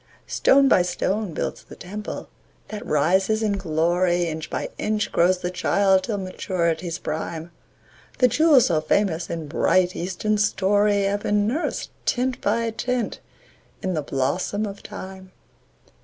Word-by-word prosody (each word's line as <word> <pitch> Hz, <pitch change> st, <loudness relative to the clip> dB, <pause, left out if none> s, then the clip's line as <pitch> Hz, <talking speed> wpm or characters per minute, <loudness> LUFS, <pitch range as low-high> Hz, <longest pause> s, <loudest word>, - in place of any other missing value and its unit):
Stone 275 Hz, 0 st, +4 dB
by 190 Hz, -, +5 dB
stone 185 Hz, +3 st, -1 dB
builds -, -, -4 dB
the -, -, -13 dB
temple 210 Hz, +4 st, -7 dB, 0.4 s
that 215 Hz, +1 st, -6 dB
rises 190 Hz, +6 st, +2 dB
in 215 Hz, -, +1 dB
glory, 175 Hz, +1 st, +1 dB
Inch 160 Hz, -2 st, -4 dB
by -, -, -3 dB
inch 215 Hz, 0 st, -1 dB
grows 180 Hz, +2 st, +3 dB
the 180 Hz, -, -2 dB
child 190 Hz, +1 st, +3 dB
till 215 Hz, -3 st, -2 dB
maturity's 175 Hz, -3 st, -2 dB
prime; 160 Hz, +2 st, -5 dB, 0.7 s
The 250 Hz, -, +5 dB
jewels 280 Hz, 0 st, +5 dB
so 160 Hz, -3 st, +1 dB
famous 170 Hz, -1 st, 0 dB
in 165 Hz, -2 st, -4 dB
bright, 180 Hz, +4 st, +2 dB
Eastern 190 Hz, +4 st, -1 dB
story 205 Hz, 0 st, +2 dB
Have 200 Hz, +1 st, 0 dB
been 205 Hz, 0 st, +1 dB
nursed, 270 Hz, +10 st, -2 dB, 0.2 s
tint 255 Hz, 0 st, 0 dB
by 230 Hz, +3 st, +1 dB
tint, 245 Hz, +1 st, -2 dB, 0.6 s
in 185 Hz, -, -1 dB
the 155 Hz, -, -1 dB
blossom 145 Hz, +10 st, -1 dB
of 200 Hz, -1 st, -7 dB
Time. 190 Hz, 0 st, -9 dB
190 Hz, 140 wpm, -23 LUFS, 175-210 Hz, 0.7 s, by